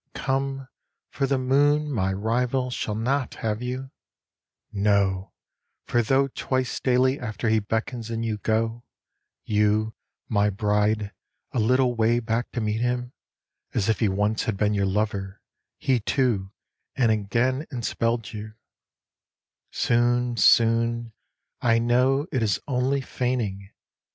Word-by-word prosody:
_ - - -6
_Come, 135 0 -1 0.4
for 135 - -1
the 135 0 +1
moon, 145 +3 +2
my 95 -7 0
rival, 125 +5 0
shall 105 -3 -3
not 130 +4 -1
have 110 0 -2
you; 130 +2 -4 0.8
No, 100 -2 +1 0.5
for 120 - +2
tho 135 +4 +2
twice 130 -1 -2
daily 130 +1 +2
afar 110 -1 -2
he 110 - +4
beckons 110 +2 -3
and 115 0 -2
you 110 -2 -2
go, 115 +2 -1 0.6
You, 105 +1 +1 0.3
my 105 -2 +2
bride, 105 +1 0 0.4
a - - -1
little 125 +3 +3
way 115 +1 +3
back 115 0 -2
to 125 - -2
meet 110 +1 -1
him, 125 +1 -1 0.6
As 100 - +1
if 110 - +1
he 110 - +2
once 105 +3 0
had 110 -3 -1
been 105 +1 +1
your 100 -1 +1
lover, 100 -1 -2 0.4
he 130 -2 +1
too, 110 -5 0 0.4
and 120 -4 +3
again 115 +7 0
enspelled 115 -2 -2
you, 110 0 -7 1.1
Soon, 120 +1 +1
soon, 115 0 +3 0.5
I 115 -1 +3
know 125 +4 +2
it 130 -5 0
is 105 -4 +1
only 135 +1 +1
feigning! 115 -7 -2
115 Hz, 135 wpm, -25 LUFS, 105-125 Hz, 1.1 s, he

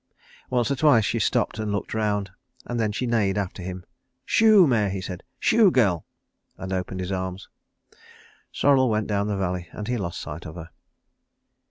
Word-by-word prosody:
Once 125 0 +1
or - - +2
twice 130 -6 +4
she - - 0
stopped - - 0
and 110 -1 -2
looked 100 -1 -3
round, 105 -3 -1 0.3
and 120 -1 -3
then 110 -2 +1
she 115 +4 -2
neighed 105 -5 +1
after 95 -1 -3
him. 90 0 -7 0.4
"Shoo, 215 -4 +6
mare!" 110 -8 +2
he 95 0 -3
said. 90 -1 -6 0.2
"Shoo, 225 -4 +5
girl!" 100 - +1 0.5
and 95 +1 -5
opened 95 0 -3
his 90 +1 -4
arms. 95 0 -4 1.0
Sorrel 135 -3 +3
went 110 -1 0
down 100 -1 -1
the 105 -1 -1
valley 90 -2 -2
and 105 - -6
he 125 - -1
lost 85 -5 -4
sight 80 +4 -7
of 80 - -9
her. 85 -1 -9
100 Hz, 180 wpm, -24 LUFS, 95-120 Hz, 1.0 s, Shoo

